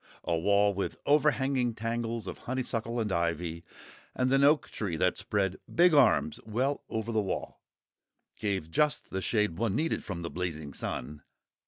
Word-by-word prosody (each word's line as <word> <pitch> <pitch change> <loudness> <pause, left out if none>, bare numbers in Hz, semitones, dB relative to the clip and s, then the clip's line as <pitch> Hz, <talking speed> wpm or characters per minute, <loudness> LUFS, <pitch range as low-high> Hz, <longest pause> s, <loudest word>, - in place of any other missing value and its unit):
A 85 - 0
wall 100 +4 +3
with 100 0 -3
overhanging 135 -5 +2
tangles 115 -1 -3
of - - -6
honeysuckle 120 -2 -2
and 110 -3 -1
ivy, 85 -1 -1 0.5
and 130 +1 +1
an 135 0 +4
oak 150 +2 +4
tree 95 -7 -3
that - - +2
spread 95 -2 -1 0.2
big 175 0 +6
arms 125 - +4
well 130 +6 -1
over 110 +1 -3
the 110 -1 +2
wall, 95 - -4 0.7
gave 95 -6 -2
just 150 - +1
the 95 - -2
shade 105 -5 0
one 110 -3 0
needed 160 +6 0
from 85 -4 -5
the 85 - -4
blazing 80 -5 -4
sun. 75 +4 -4
110 Hz, 160 wpm, -30 LUFS, 90-125 Hz, 0.7 s, big